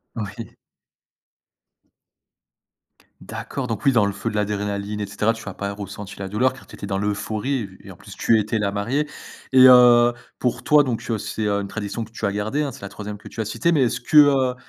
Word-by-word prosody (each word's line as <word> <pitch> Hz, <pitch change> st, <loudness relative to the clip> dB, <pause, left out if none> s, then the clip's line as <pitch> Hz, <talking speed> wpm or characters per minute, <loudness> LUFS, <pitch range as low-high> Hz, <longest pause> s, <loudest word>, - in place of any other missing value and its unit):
Oui. 110 Hz, 0 st, -7 dB, 2.7 s
D'accord, 135 Hz, -2 st, -5 dB
donc 115 Hz, -4 st, -4 dB
oui, 135 Hz, -, +5 dB
dans 110 Hz, -4 st, +4 dB
le 100 Hz, -, 0 dB
feu 100 Hz, +3 st, -4 dB
de 105 Hz, -, -6 dB
l'adrénaline 105 Hz, 0 st, -2 dB
et 105 Hz, -, -2 dB
cetera, 105 Hz, +2 st, 0 dB
tu 115 Hz, -2 st, -11 dB
as 105 Hz, -, -5 dB
pas 100 Hz, +1 st, -4 dB
ressenti 100 Hz, 0 st, -8 dB
la 95 Hz, -, -4 dB
douleur 115 Hz, +7 st, +1 dB
car 130 Hz, -, -15 dB
tu -, -, -12 dB
étais -, -, -7 dB
dans 100 Hz, -1 st, -2 dB
l'euphorie 105 Hz, +3 st, -2 dB
et -, -, -16 dB
et -, -, -9 dB
en -, -, -12 dB
plus -, -, -13 dB
tu 115 Hz, -, +3 dB
étais 110 Hz, +1 st, -1 dB
la 100 Hz, -1 st, 0 dB
mariée 125 Hz, +9 st, -1 dB, 0.5 s
et 130 Hz, 0 st, +9 dB
heu, 120 Hz, -1 st, +7 dB, 0.3 s
pour 125 Hz, -1 st, -2 dB
toi 150 Hz, -1 st, +6 dB
donc, 125 Hz, -5 st, -2 dB
heu, 115 Hz, -, 0 dB
c'est, 110 Hz, +1 st, -4 dB
heu, 100 Hz, -1 st, 0 dB
une 100 Hz, -, -5 dB
tradition 105 Hz, +2 st, -4 dB
que 110 Hz, -, -12 dB
tu 115 Hz, -, -4 dB
as 100 Hz, -, +1 dB
gardée, 110 Hz, +8 st, -1 dB
hein, 140 Hz, -, -3 dB
c'est -, -, -13 dB
la 100 Hz, -, -6 dB
3ème 105 Hz, +1 st, -7 dB
que 100 Hz, -, -13 dB
tu -, -, -11 dB
as 110 Hz, -, -1 dB
citée 170 Hz, +10 st, 0 dB
mais 150 Hz, -5 st, +3 dB
est-ce 120 Hz, -, -1 dB
que, 150 Hz, +5 st, +1 dB
heu, 135 Hz, -4 st, +5 dB
110 Hz, 230 wpm, -22 LUFS, 100-125 Hz, 2.7 s, et